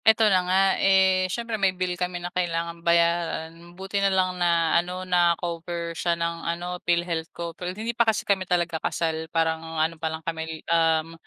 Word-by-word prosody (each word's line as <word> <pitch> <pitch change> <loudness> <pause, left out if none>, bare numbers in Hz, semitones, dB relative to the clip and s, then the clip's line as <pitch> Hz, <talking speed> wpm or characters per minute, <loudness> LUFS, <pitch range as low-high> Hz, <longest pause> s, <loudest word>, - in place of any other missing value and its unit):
Eto 220 0 +6
na 185 - +4
nga 185 +1 +4 0.2
eh, 190 -1 +4
siyempre 230 +1 -3
may 190 -1 +2
bill 180 -1 -1
kami 180 0 -3
na 175 0 -6
kailangang 170 -1 -2
bayaran. 170 0 0
Buti 195 +1 -2
na 200 - +3
lang 185 -1 +1
na 170 -2 +2
ano 180 +1 -6
na 175 -2 +3
cover 170 -1 -4
siya 170 0 -1
ng 170 0 -2
ano 175 +1 -4
Philhealth 170 -1 -1
ko 170 -1 -6
pero 180 +2 -5
hindi 220 +5 -4
pa 235 -1 +3
kasi 220 - -1
kami 190 -2 0
talaga 170 -2 0
kasal 160 -1 -2
parang 160 0 0
ano 160 0 -2
pa 160 - 0
lang 160 0 -7
kami 160 -1 -5
um, 165 -1 +2
170 Hz, 190 wpm, -25 LUFS, 165-185 Hz, 0.2 s, Eto